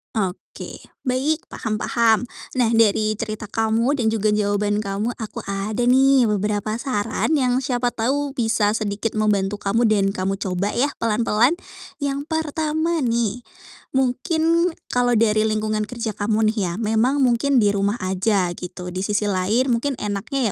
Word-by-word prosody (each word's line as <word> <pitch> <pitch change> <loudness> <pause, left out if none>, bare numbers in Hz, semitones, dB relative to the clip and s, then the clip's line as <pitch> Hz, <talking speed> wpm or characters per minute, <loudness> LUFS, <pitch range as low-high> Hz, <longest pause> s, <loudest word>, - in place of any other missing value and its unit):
Oke. 190 -4 -4 0.3
Baik, 285 +6 0
paham 215 -1 -4
paham. 235 -1 +2 0.3
Nah, 240 - +4
dari 215 -1 +3
cerita 215 0 -5
kamu 225 +5 +1
dan 230 -5 +1
juga 215 -1 0
jawaban 205 0 0
kamu, 205 +4 -2
aku 220 -2 -6
ada 200 +4 -2
nih 265 0 +5
beberapa 210 +1 -1
saran 230 +2 -1
yang 255 -2 +2
siapa 245 -1 0
tahu 275 +4 -1
bisa 225 -3 +1
sedikit 215 0 -2
membantu 210 -2 +1
kamu 210 +3 +1
dan 200 -2 +2
kamu 195 0 -2
coba 190 +1 -2
ya 280 +4 +1
pelan-pelan. 230 +5 +2 0.5
Yang 280 +1 -2
pertama 315 +1 -1
nih, 235 -4 0 0.6
mungkin 320 +6 +1 0.2
kalau 245 -1 +2
dari 215 -1 +3
lingkungan 215 0 -1
kerja 230 -2 -4
kamu 215 +1 +1
nih 225 - -11
ya, 170 - -3
memang 230 +6 +1
mungkin 260 +3 +2
di 205 - +4
rumah 200 +1 0
aja 190 0 +1
gitu. 180 0 -7
Di 185 - -4
sisi 210 0 0
lain 215 +8 +1
mungkin 255 +4 0
enaknya 210 +4 -2
220 Hz, 150 wpm, -22 LUFS, 205-255 Hz, 0.6 s, nih